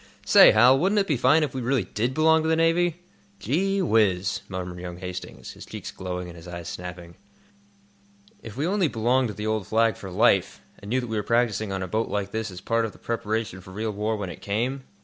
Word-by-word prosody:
Say, -, -, +8 dB
Hal, 125 Hz, +5 st, +6 dB
wouldn't 195 Hz, +6 st, +1 dB
it 200 Hz, -, +3 dB
be 155 Hz, -, 0 dB
fine 130 Hz, +6 st, +4 dB
if 145 Hz, -, -3 dB
we 130 Hz, -, -3 dB
really 125 Hz, -2 st, +1 dB
did 115 Hz, +7 st, -2 dB
belong 160 Hz, +1 st, +4 dB
to 160 Hz, -, -1 dB
the 160 Hz, -, +3 dB
Navy?" 165 Hz, +1 st, +1 dB, 0.4 s
"Gee 190 Hz, -, 0 dB
whiz!" 105 Hz, -, +2 dB
murmured 90 Hz, -2 st, -5 dB
young 90 Hz, -1 st, -7 dB
Hastings, 90 Hz, 0 st, -7 dB
his -, -, -12 dB
cheeks -, -, -8 dB
glowing 90 Hz, -1 st, -5 dB
and 85 Hz, -, -10 dB
his 85 Hz, +1 st, -12 dB
eyes 85 Hz, -2 st, -7 dB
snapping. 90 Hz, -1 st, -8 dB, 1.3 s
"If 115 Hz, 0 st, -10 dB
we 145 Hz, -, 0 dB
only 190 Hz, -1 st, +2 dB
belonged 125 Hz, +1 st, +1 dB
to 105 Hz, -, -6 dB
the 105 Hz, -, -5 dB
old 110 Hz, -3 st, -1 dB
Flag 115 Hz, 0 st, +2 dB
for 95 Hz, -, -9 dB
life, 100 Hz, -1 st, +2 dB, 0.2 s
and 100 Hz, -, -10 dB
knew 130 Hz, +3 st, +1 dB
that 120 Hz, -, -6 dB
we 110 Hz, -1 st, -3 dB
were -, -, +1 dB
practising 110 Hz, -2 st, 0 dB
on 95 Hz, -1 st, -3 dB
a -, -, -4 dB
boat 110 Hz, +5 st, -1 dB
like 100 Hz, -1 st, -2 dB
this 110 Hz, -1 st, -3 dB
as 90 Hz, -1 st, -9 dB
a -, -, -29 dB
part 115 Hz, 0 st, +1 dB
of 110 Hz, -, -6 dB
the -, -, -16 dB
preparation 110 Hz, -4 st, -3 dB
for 95 Hz, -, -14 dB
real 110 Hz, +4 st, -3 dB
war 105 Hz, +2 st, -2 dB
when 100 Hz, -3 st, -4 dB
it -, -, -11 dB
came?" 125 Hz, +6 st, -2 dB
110 Hz, 235 wpm, -25 LUFS, 95-130 Hz, 1.3 s, Say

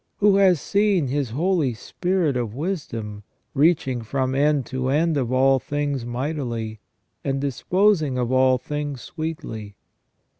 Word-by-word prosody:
Who 205 Hz, -1 st, +4 dB
has 185 Hz, -5 st, +5 dB
seen 200 Hz, -7 st, +1 dB
His 140 Hz, -2 st, -1 dB
Holy 155 Hz, -1 st, +1 dB
Spirit 175 Hz, -, -1 dB
of 120 Hz, -3 st, -2 dB
wisdom, 120 Hz, -, -4 dB, 0.3 s
"reaching 140 Hz, -4 st, +2 dB
from 130 Hz, +3 st, -1 dB
end 145 Hz, -1 st, +2 dB
to 130 Hz, +1 st, -2 dB
end 160 Hz, +3 st, +2 dB
of 130 Hz, -4 st, -1 dB
all 135 Hz, +1 st, +4 dB
things 145 Hz, -3 st, -2 dB
mightily, 120 Hz, -4 st, -3 dB, 0.4 s
and 135 Hz, 0 st, -1 dB
disposing 155 Hz, -, +1 dB
of 125 Hz, -1 st, -1 dB
all 130 Hz, 0 st, +4 dB
things 145 Hz, 0 st, -4 dB
sweetly 150 Hz, -, -6 dB
140 Hz, 135 wpm, -23 LUFS, 125-160 Hz, 0.4 s, has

